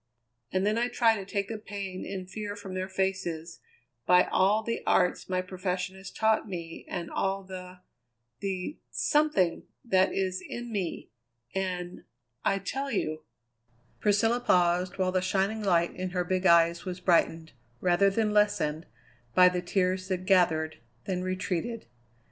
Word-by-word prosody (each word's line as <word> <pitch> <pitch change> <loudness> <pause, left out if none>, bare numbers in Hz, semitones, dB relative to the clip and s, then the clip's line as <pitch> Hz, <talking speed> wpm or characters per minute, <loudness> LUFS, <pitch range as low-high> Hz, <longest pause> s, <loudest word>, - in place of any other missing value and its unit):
And 190 +1 +1
then 215 +2 +2
I 240 - +2
try 235 -2 +3
to 200 - -5
take 200 0 -2
the 220 0 -5
pain 200 -3 -6
and 185 -2 -5
fear 205 +1 -5
from 200 -2 -8
their 185 +1 -3
faces 185 -4 -2 0.5
by 180 0 +7
all 205 +4 +2
the 230 +1 -2
arts 180 0 +2
my 185 0 0
profession 185 0 -3
has 190 0 -9
taught 220 -1 +1
me 170 -3 -6
and 170 -2 -4
all 195 0 -1
the 185 -1 -9 0.6
the 190 +7 -3
something 295 - +2 0.2
that 190 -4 +3
is 185 -1 -1
in 240 0 -7
me, 190 -6 -3 0.4
and 180 -2 -3 0.4
I 195 - +2
tell 270 +9 -3
you 155 - -2 0.4
" 120 0 -38
Priscilla 220 +3 +3
paused, 180 -4 +2
while 185 -1 +1
the 185 0 +1
shining 195 +4 0
light 175 -4 +2
in 185 0 -3
her 180 0 -1
big 185 +1 +1
eyes 170 0 +5
was 180 -1 -5
brightened, 165 -3 +2 0.3
rather 180 +5 +4
than 210 +1 0
lessened, 205 -7 +1 0.5
by 180 0 +8
the 180 0 -2
tears 185 0 0
that 185 -1 -2
gathered, 160 -4 +3 0.3
then 185 -2 -2
retreated. 185 +4 -2
185 Hz, 155 wpm, -29 LUFS, 180-200 Hz, 0.6 s, by